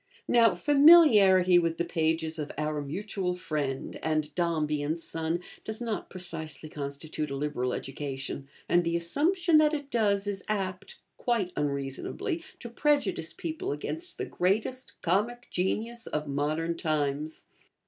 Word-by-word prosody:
Now 230 -5 +5
familiarity 210 - +7
with 165 -1 0
the 170 - 0
pages 160 -1 0
of 150 - -4
'Our 150 0 -1
Mutual 180 +4 -3
Friend'and 155 -1 -2
'Dombey 155 -4 0
and 155 +3 -1
Son' 165 +1 -2 0.2
does 220 0 -4
not 230 -3 -3
precisely 160 -5 -6
constitute 150 +1 -4
a 140 - -3
liberal 135 -3 -1
education, 135 +1 -4 0.2
and 175 0 +3
the 170 0 0
assumption 315 - +2
that 305 0 +4
it 285 -1 -6
does 205 -3 +2
is 200 -2 -1
apt 195 -2 -3 0.2
(quite 225 -7 0
unreasonably) 140 - -2 0.2
to 240 - -5
prejudice 235 - +1
people 320 - -4
against 325 - -4
the - - -2
greatest 220 +8 -1
comic 220 +8 0
genius 225 +6 -2
of 150 0 -3
modern 155 +4 -1
times. 150 -1 -1
175 Hz, 135 wpm, -29 LUFS, 150-220 Hz, 0.2 s, familiarity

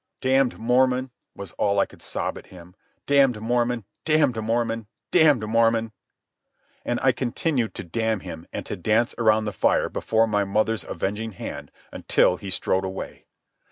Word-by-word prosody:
"Damned 130 0 +2
Mormon!" 125 +2 +2 0.2
was 100 -3 -8
all 100 0 +2
I 100 - +4
could - - -18
sob - - -3
at - - -11
him. 90 0 -14 0.3
"Damned 135 -5 +3
Mormon! 120 0 0 0.2
Damned 145 -7 +2
Mormon! 115 0 -1 0.2
Damned 150 -10 +4
Mormon!" 115 0 +2 0.9
And 120 - -1
I 130 - +5
continued 125 0 -1
to - - -5
damn 110 +3 -1
him 80 +1 -9
and - - -5
to - - -4
dance 110 +6 +1
around 110 -1 +3
the 105 - -3
fire 85 - +2
before 110 0 +1
my 105 -2 +1
mother's 110 +2 0
avenging 105 +3 -4
hand, - - -7 0.2
until 90 - +2
he 100 - -8
strode 95 +1 0
away. 95 0 -7
115 Hz, 155 wpm, -24 LUFS, 105-125 Hz, 0.9 s, I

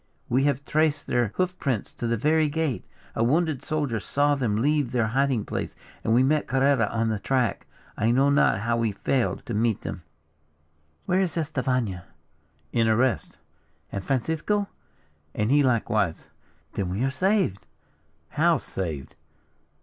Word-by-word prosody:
We 130 +3 +2
have 140 -1 0
traced 155 -1 +1
their 120 -1 +1
hoof 185 0 0
tracks 125 -8 -2
to 120 - -4
the 115 0 +1
very 155 +5 +2
gate. 150 -4 -1 0.3
A 115 - +1
wounded 150 +1 +1
soldier 145 -8 -1
saw 145 +7 +1
them 125 -7 0
leave 145 0 +1
their 120 -3 +1
hiding 130 -3 +1
place, - - -4 0.3
and 110 - 0
we 120 +3 +5
met 150 +3 +2
Carrera 135 -4 +3
on 115 +1 0
their 110 -2 -1
track. 125 +1 0 0.3
I 110 - +1
know 135 +4 +4
not 140 -8 +3
how 115 +1 0
we 115 -3 0
failed 125 +5 -1
to 120 - -4
meet 110 0 +1
them." 90 - -5 1.0
"Where 180 - +2
is 180 -3 -1
Estefania?" 130 - -1 0.7
"In 115 -1 +3
arrest." 120 +3 +1 0.5
"And 100 - -4
Francisco?" 160 - 0 0.7
"And 105 +3 0
he 145 +1 +5
likewise." 110 - +1 0.5
"Then 95 -3 -2
we 95 +7 -1
are 135 - +1
saved." 185 - 0 0.6
"How 165 +2 +3
saved?" 80 - -5
130 Hz, 155 wpm, -25 LUFS, 115-150 Hz, 1.0 s, we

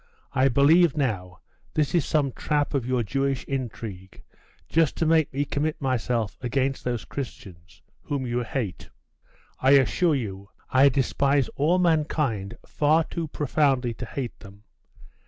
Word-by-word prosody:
I 130 +1 +3
believe, 150 +5 +4
now, 95 -10 -2 0.3
this 150 -2 +1
is 170 -5 +2
some 145 -3 +1
trap 145 +3 -1
of 130 -4 -1
your 125 -2 +1
Jewish 135 +4 -1
intrigue, 110 -8 -6 0.4
just 165 -3 +1
to 165 - +1
make 160 -2 +3
me 140 +2 -1
commit 150 +2 -2
myself 120 -4 -1
against 130 +2 -1
those 120 -2 -3
Christians, 95 -10 -9 0.2
whom 140 -3 -3
you 120 0 -1
hate.' 115 -5 -4 0.7
'I 130 - +3
assure 140 - +3
you, 100 -6 -5 0.2
I 135 +2 +6
despise 140 +1 +1
all 160 +6 +1
mankind 150 - 0
far 155 +2 +2
too 165 0 -5
profoundly 135 -4 +1
to 120 +1 -7
hate 125 -2 -5
them. 100 0 -14
135 Hz, 140 wpm, -25 LUFS, 115-145 Hz, 0.7 s, I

